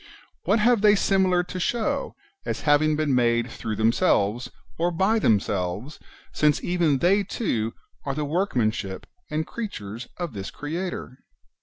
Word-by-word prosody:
What - - +3
have 230 0 +3
they 210 0 +6
similar 190 -3 +2
to 180 +1 -6
show, 255 +9 -1 0.3
as - - -3
having 150 +1 +3
been 150 -2 0
made 120 -1 +2
through 110 -2 -4
themselves, 110 +1 +2 0.3
or 170 +1 +2
by 190 +6 +2
themselves, 105 - 0 0.3
since 150 -1 +2
even 170 -5 +2
they 185 +8 +3
too 115 - -2 0.3
are 140 -1 -3
the 150 0 -1
workmanship 125 - -1 0.2
and 155 +1 -1
creatures 115 - -6
of 175 -6 -4
this 100 -1 -5
[Creator] 155 -4 -5
150 Hz, 140 wpm, -25 LUFS, 115-185 Hz, 0.3 s, they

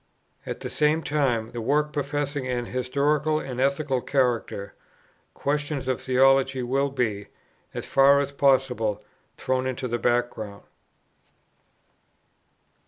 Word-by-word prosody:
At - - -5
the - - -4
same 155 +2 +2
time, 125 -7 0
the 120 - -5
work 150 +5 +1
professing 145 -1 -2
an 120 -1 -2
historical 145 +5 0
and 130 -4 -4
ethical 140 -1 +1
character, 120 -7 -1 0.6
questions 145 -1 -2
of 130 -2 -1
theology 135 0 +3
will 135 +3 +1
be, 115 -7 -2 0.5
as - - -4
far 140 +1 +5
as 140 0 -1
possible, 130 -7 +1 0.3
thrown 130 0 -1
into 130 0 -3
the 120 0 -2
back 120 0 +1
ground. 100 -2 -8
135 Hz, 120 wpm, -25 LUFS, 120-140 Hz, 0.6 s, far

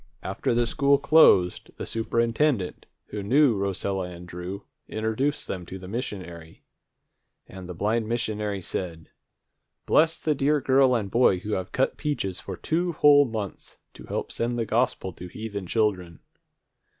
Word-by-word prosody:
After - - -1
the 120 0 +3
school 140 +4 +3
closed, 115 - +4
the - - -5
superintendent, 115 -1 0 0.2
who 105 - -4
knew 130 +4 +4
Rosella 95 -1 -2
and 90 0 -10
Drew, 90 +3 -6 0.2
introduced 110 +7 -1
them 90 -2 -4
to 95 - -7
the 95 -1 -10
missionary. 90 -8 -6 0.8
And 95 -1 -10
the 90 - -6
blind 110 +4 0
missionary 105 -4 -2
said, 85 -3 -5 0.7
"Bless 165 +1 +3
the 155 - 0
dear 145 +2 +2
girl 130 -1 +4
and 100 -4 -2
boy 120 -5 +4
who 105 +1 -5
have 95 -2 -2
cut 135 - 0
peaches 120 - -2
for 95 -2 -7
two 170 - -1
whole 145 -1 +6
months 110 -5 -6 0.2
to - - -12
help - - -4
send 120 +1 -2
the 115 - 0
gospel 110 -4 0
to 90 - -9
heathen 100 0 -6
children!" 90 -6 -1
110 Hz, 150 wpm, -26 LUFS, 95-130 Hz, 0.8 s, whole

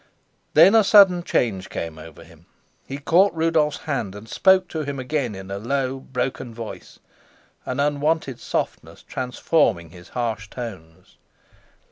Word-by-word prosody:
Then 195 - +8
a 225 -1 +6
sudden 195 -3 +6
change 105 - -1
came 80 -1 -5
over 80 0 -12
him. - - -19 0.4
He 135 - -5
caught 170 +6 +3
Rudolf's 160 -2 +1
hand 115 -10 -3
and 105 +2 -10
spoke 190 - +3
to 160 - -3
him 140 -2 -4
again 130 -4 -2
in 95 0 -9
a 100 - -4
low, 135 +3 -2
broken 125 -2 -4
voice, 115 -1 -9 0.7
an 130 +1 -3
unwonted 145 -2 0
softness - - -4
transforming 125 - 0
his 85 0 -14
harsh 110 -4 -3
tones. 95 -11 -9
130 Hz, 140 wpm, -23 LUFS, 105-155 Hz, 0.7 s, Then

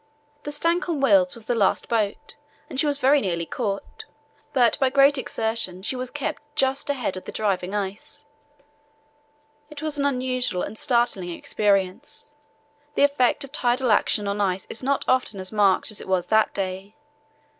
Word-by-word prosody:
The 295 - -3
Stancomb 335 +1 0
Wills 275 -1 +4
was 230 -2 -12
the 245 - 0
last 205 -5 +1
boat 225 +5 -1 0.3
and 265 - -4
she 300 - +3
was 285 -1 0
very 280 +1 +4
nearly 170 -3 -2
caught, 200 0 -4 0.5
but 245 0 +3
by 265 -2 +3
great 275 +1 +5
exertion 220 -7 -2
she 260 - 0
was 255 0 -4
kept 290 -1 -4
just 270 -1 +1
ahead 250 -9 -1
of 185 - -9
the - - -6
driving 195 -2 -1
ice. 200 +7 -4 1.4
It 300 0 -8
was 305 -2 -2
an 280 - +1
unusual 255 -7 0
and 210 - -5
startling 235 -7 +1
experience. 200 +9 -1 0.6
The - - +3
effect 280 -1 +2
of 275 - -10
tidal 250 -3 +1
action 205 0 +2
on 200 +1 -1
ice 190 -1 0
is - - -4
not 275 +1 0
often 255 -6 +1
as 185 0 -5
marked 205 -1 +3
as 210 - -5
it - - -10
was 185 -2 +1
that 220 0 +3
day. 195 +1 -4
240 Hz, 170 wpm, -24 LUFS, 200-275 Hz, 1.4 s, great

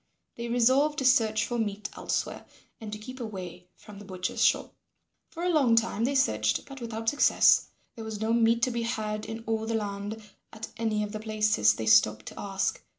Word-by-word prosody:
They 235 0 -5
resolved 260 +6 +3
to 265 - -1
search 220 -4 +3
for 240 -1 -3
meat 210 -1 -3
elsewhere - - -3 0.3
and 220 -2 -8
to 210 - -5
keep 255 +5 -10
away 185 -6 -7
from 205 -2 -13
the - - -10
butcher's 185 -1 -3
shop. - - +2 0.6
For 335 - -7
a 360 - +1
long 275 -9 +3
time 230 0 +1
they 280 +2 -1
searched, 110 - +1
but 275 -1 -11
without 225 -1 -6
success. 290 - +4 0.3
There 225 - -8
was 220 -1 -6
no 220 +1 0
meat 230 0 +3
to 255 - +2
be 235 0 -2
had 215 -2 -3
in 225 0 -6
all 220 0 -2
the 230 - -1
land 205 0 -4 0.3
at 220 +1 -8
any 220 -2 -1
of 210 - -5
the 215 - -5
places 215 - +2
they 110 - -4
stopped 110 0 +4
to - - -12
ask. 195 -1 -2
220 Hz, 205 wpm, -28 LUFS, 205-235 Hz, 0.6 s, success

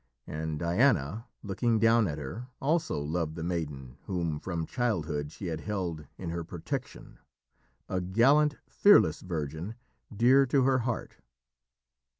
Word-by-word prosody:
And 80 0 -4
Diana, 95 - +1 0.2
looking 110 +3 +1
down 115 -1 +4
at 75 -3 -3
her, 90 - -6
also 155 - 0
loved 80 +2 -2
the 80 - -5
maiden 75 -7 -4
whom 85 -5 -2
from 85 -2 -3
childhood 80 - -1
she 95 - -8
had 80 -3 -3
held 90 -8 -3
in 85 -3 -5
her 85 0 -3
protection 80 0 -6 0.7
a 95 -1 -1
gallant, 135 +11 +4
fearless 200 - +5
virgin 80 +3 -4 0.4
dear 125 +5 +5
to 135 +1 +3
her 130 0 +3
heart. 120 -1 -3
90 Hz, 135 wpm, -29 LUFS, 80-115 Hz, 0.7 s, fearless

